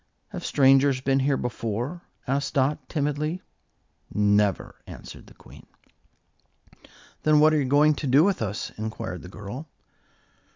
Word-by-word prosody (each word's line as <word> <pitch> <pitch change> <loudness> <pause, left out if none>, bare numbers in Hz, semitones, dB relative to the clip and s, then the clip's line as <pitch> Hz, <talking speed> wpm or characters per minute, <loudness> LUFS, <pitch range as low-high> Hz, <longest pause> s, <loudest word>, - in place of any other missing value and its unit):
"Have - - -7
strangers 135 -1 +4
been 135 +1 +1
here 135 0 +1
before?" 120 - -4 0.2
asked 140 +2 -2
Dot, 140 +2 0
timidly. 150 +3 -2 0.7
"Never," 105 -2 +1
answered - - -11
the - - -17
Queen. - - -16 1.5
"Then 155 -1 +4
what 155 +1 +5
are 155 - +3
you - - -1
going 145 +3 +4
to 145 - -3
do 135 +4 +5
with 195 -5 +1
us?" 105 -1 -3
inquired 110 -4 -5
the 90 - -11
girl. 105 - -8
135 Hz, 135 wpm, -25 LUFS, 110-150 Hz, 1.5 s, what